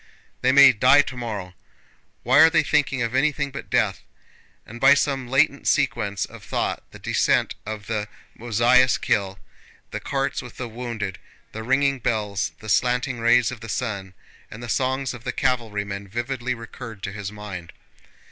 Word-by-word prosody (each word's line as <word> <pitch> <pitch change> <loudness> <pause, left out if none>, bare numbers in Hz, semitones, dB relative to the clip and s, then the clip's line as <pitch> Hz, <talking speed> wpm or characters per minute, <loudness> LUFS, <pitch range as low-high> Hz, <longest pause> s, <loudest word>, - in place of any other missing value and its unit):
"They 130 - +3
may 140 0 +9
die 130 +5 +5
tomorrow; 110 -9 -6 0.7
why 130 +4 +4
are 160 +1 +9
they 165 0 +3
thinking 140 -4 +1
of 115 0 -3
anything 145 +1 +1
but 135 - -8
death?" 110 -6 +1 0.6
And 120 +2 -11
by 140 +1 +7
some 140 -2 -1
latent 140 +2 +2
sequence 100 -4 +1
of - - -13
thought - - -2
the - - -12
descent - - +1
of 110 -2 -5
the 105 -1 -2 0.3
Mozháysk 120 +3 +3
hill, 100 -1 0 0.5
the - - -4
carts - - -2
with - - -12
the 125 - -4
wounded, 115 -4 -5 0.3
the 110 - -6
ringing 135 +3 +1
bells, 105 -5 -1
the 110 - -10
slanting 125 +2 +1
rays 120 0 +4
of 130 - -8
the 115 0 -9
sun, 100 -4 -4 0.3
and 110 +3 -10
the 120 - -7
songs 130 +2 0
of 120 -2 -10
the - - -2
cavalrymen 100 -5 -2
vividly 120 +4 -3
recurred 115 -2 -10
to 95 - -3
his 100 0 -6
mind. 100 -5 -8
120 Hz, 165 wpm, -23 LUFS, 105-130 Hz, 0.7 s, may